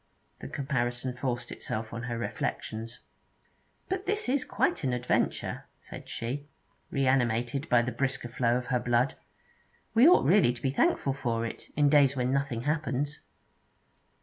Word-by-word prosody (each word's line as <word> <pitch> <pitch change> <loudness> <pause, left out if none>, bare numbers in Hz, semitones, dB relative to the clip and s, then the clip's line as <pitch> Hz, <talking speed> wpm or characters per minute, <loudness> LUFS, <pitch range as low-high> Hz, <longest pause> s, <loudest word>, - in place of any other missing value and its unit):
The - - -7
comparison 130 -2 -2
forced 120 -2 -3
itself 110 +1 -4
on 115 - -4
her 120 - -2
reflections. 115 0 -4 0.9
'But 380 +1 -3
this 420 -4 0
is 265 +1 +1
quite 355 - 0
an 130 -2 +1
adventure,' 125 0 -1
said - - -11
she, 135 +5 -4 0.4
reanimated 130 0 +1
by 120 -1 +5
the 125 - -2
brisker 135 -2 -2
flow 120 0 +1
of 125 - -4
her 125 - +3
blood. 120 +2 +2 0.8
'We 235 +6 +7
ought 360 - +5
really 180 -10 +5
to 120 - -11
be 135 - +1
thankful 140 0 +2
for 115 -4 -1
it, 115 - -7
in 145 -1 +4
days 140 -2 +5
when 125 0 0
nothing 135 -4 -1
happens.' 145 -1 -1
130 Hz, 150 wpm, -29 LUFS, 120-140 Hz, 0.9 s, We